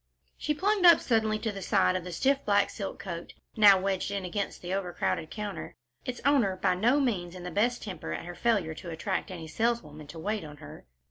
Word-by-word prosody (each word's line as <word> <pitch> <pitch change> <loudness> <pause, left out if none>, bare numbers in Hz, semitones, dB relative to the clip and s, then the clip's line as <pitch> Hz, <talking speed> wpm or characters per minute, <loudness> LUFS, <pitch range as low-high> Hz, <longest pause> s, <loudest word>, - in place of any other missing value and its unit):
She 300 - -2
plunged 400 +4 +1
up 340 -2 +9
suddenly 220 -2 +1
to 220 0 -2
the 200 -1 -7
side 185 - +2
of 185 - -2
the 180 - -7
stiff 270 +11 +1
black 205 -1 +2
silk 200 -3 -5
coat, 170 -3 -7 0.2
now 205 -3 +7
wedged 190 0 -1
in 200 -2 -3
against 200 +2 -4
the 180 +1 -3
overcrowded 165 - -2
counter, 205 -7 -6 0.3
its 250 -1 -4
owner 255 -10 +3
by 185 0 +1
no 235 +10 +3
means 185 -10 -1
in 180 - -8
the 180 - -5
best 240 +4 +1
temper 195 -4 -6
at - - -4
her 175 - -6
failure 200 -6 +1
to 170 +2 -9
attract 170 +4 -3
any 170 -4 -7
saleswoman 155 -6 -2
to 165 - -10
wait 205 +5 -2
on 150 -1 -10
her. 145 - -12
195 Hz, 215 wpm, -29 LUFS, 175-225 Hz, 0.3 s, up